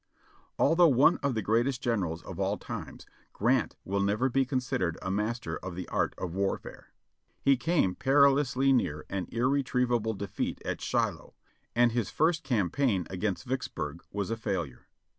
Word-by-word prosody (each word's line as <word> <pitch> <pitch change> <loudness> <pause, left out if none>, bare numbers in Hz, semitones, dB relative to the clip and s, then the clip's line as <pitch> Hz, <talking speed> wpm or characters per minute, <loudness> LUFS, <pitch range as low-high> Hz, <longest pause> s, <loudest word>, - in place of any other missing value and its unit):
Although 165 +4 +5
one 140 +3 +5
of 140 -3 -1
the 110 - -1
greatest 120 +4 +1
generals 95 -10 -1
of - - -8
the - - 0
times. - - -7 0.3
Grant 120 +2 +1
will 100 +1 -1
never 105 +6 +1
be 135 +2 +2
considered 125 - -1
a 95 - -3
master 110 +5 -2
of 95 -2 -7
the 90 - -5
art - - 0
of 90 -3 -4
warfare. 100 +1 -3 0.6
He 140 0 +5
came 130 - +1
perilously 135 +1 +3
near 75 - 0
an 95 -2 -2
irretrievable 125 -3 +1
defeat 100 0 -3
at - - -3
Shiloh, - - -1 0.4
and 120 0 +4
his 115 -3 -1
first 165 +1 +1
cam 110 - 0
paign 105 -10 +1
against 95 0 -2
Vicksburg 90 - -4
was 100 +1 -3
a 115 - -1
failure. 85 - -4
120 Hz, 160 wpm, -29 LUFS, 95-135 Hz, 0.6 s, Although